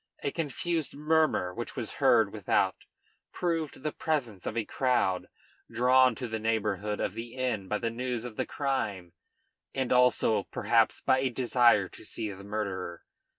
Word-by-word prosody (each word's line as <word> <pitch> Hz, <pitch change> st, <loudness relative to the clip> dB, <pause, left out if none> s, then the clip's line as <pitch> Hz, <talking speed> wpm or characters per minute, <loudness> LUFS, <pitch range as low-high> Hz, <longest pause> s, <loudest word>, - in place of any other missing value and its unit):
A 140 Hz, -, 0 dB
confused 165 Hz, +1 st, -2 dB
murmur 155 Hz, -, +2 dB
which -, -, -6 dB
was -, -, -3 dB
heard -, -, +4 dB
without -, -, +1 dB, 0.6 s
proved 165 Hz, -6 st, -2 dB
the 155 Hz, -, -1 dB
presence 125 Hz, -, -2 dB
of 110 Hz, -, -3 dB
a 115 Hz, -, 0 dB
crowd, 120 Hz, -9 st, +1 dB, 0.4 s
drawn 125 Hz, 0 st, +4 dB
to 125 Hz, -, -4 dB
the 110 Hz, -1 st, -3 dB
neighborhood 105 Hz, -2 st, -1 dB
of -, -, -1 dB
the 115 Hz, +1 st, -7 dB
inn 125 Hz, -7 st, -1 dB
by 105 Hz, -, 0 dB
the 115 Hz, +1 st, -2 dB
news 125 Hz, 0 st, -3 dB
of 120 Hz, -3 st, -7 dB
the -, -, -2 dB
crime, 105 Hz, -, -2 dB, 0.6 s
and 130 Hz, -2 st, 0 dB
also 125 Hz, -3 st, +4 dB
perhaps -, -, +1 dB
by 130 Hz, -, +3 dB
a 130 Hz, 0 st, +1 dB
desire 120 Hz, -5 st, +3 dB
to -, -, -12 dB
see 110 Hz, -1 st, -4 dB
the 100 Hz, 0 st, -10 dB
murderer. 100 Hz, -4 st, -4 dB
120 Hz, 160 wpm, -29 LUFS, 105-130 Hz, 0.6 s, heard